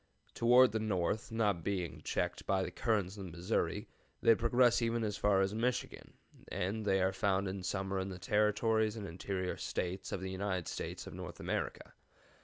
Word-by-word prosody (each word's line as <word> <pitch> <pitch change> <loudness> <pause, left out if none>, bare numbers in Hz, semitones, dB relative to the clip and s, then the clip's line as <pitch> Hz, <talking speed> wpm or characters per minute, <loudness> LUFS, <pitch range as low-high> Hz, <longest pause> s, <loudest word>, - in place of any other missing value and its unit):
Toward 125 +1 +6
the 110 - 0
north, 105 +1 -1
not 105 -7 +1
being 90 -3 -2
checked - - -2
by 95 -1 +2
the - - -4
currents 105 -4 0
of 100 - -6
the - - -7
Missouri, 85 +2 -1 0.3
they 115 - +6
progress 120 +2 +3
even 115 0 +1
as 105 -2 -1
far 100 -2 +3
as 95 +1 +1
Michigan, 120 +3 -2 0.3
and 105 +4 -2
they 95 -2 +3
are 95 +1 +2
found 95 0 +1
in 95 0 -4
summer 95 +1 -2
in 95 +1 -3
the 95 - -6
Territories 105 +3 +2
and 105 -3 -5
interior 95 +2 -3
States 90 +2 -3
of - - -2
the 95 0 -4
United 95 -2 -2
States - - -5
of - - -8
North - - -7
America. - - -3
100 Hz, 185 wpm, -34 LUFS, 95-110 Hz, 0.3 s, Toward